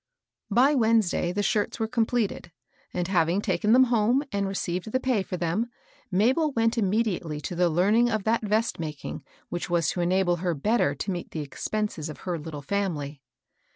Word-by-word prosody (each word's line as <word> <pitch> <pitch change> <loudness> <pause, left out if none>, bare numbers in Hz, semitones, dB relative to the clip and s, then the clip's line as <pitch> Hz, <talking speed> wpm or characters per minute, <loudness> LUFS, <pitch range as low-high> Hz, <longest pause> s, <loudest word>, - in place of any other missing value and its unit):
By 250 +7 +4
Wednesday 220 -8 +2
the 205 +3 -1
shirts 205 +2 0
were 220 - 0
completed; 225 -5 -1 0.4
and 175 -1 -2
having 175 -1 +2
taken 205 +1 0
them 255 +3 +7
home 240 +2 +2
and 200 -1 0
received 190 +1 -3
the 260 - +1
pay 255 -5 +1
for 185 -1 -5
them, 175 +8 -1 0.4
Mabel 255 - +2
went 230 -1 +2
immediately 195 -7 0
to 175 - -5
the 175 0 +3
learning 205 +9 +3
of 220 -3 -1
that 225 +2 +1
vest 215 0 0
making 155 -3 -5 0.3
which 175 0 -4
was 170 -3 +2
to 175 - -2
enable 175 0 +2
her 175 -1 -1
better 145 -2 +1
to 195 +8 -3
meet 175 -2 -5
the 155 - -4
expenses 165 +2 -3
of 150 - -9
her 175 -3 -3
litde 150 -2 -8
family. 150 -8 -2
195 Hz, 180 wpm, -26 LUFS, 170-225 Hz, 0.4 s, them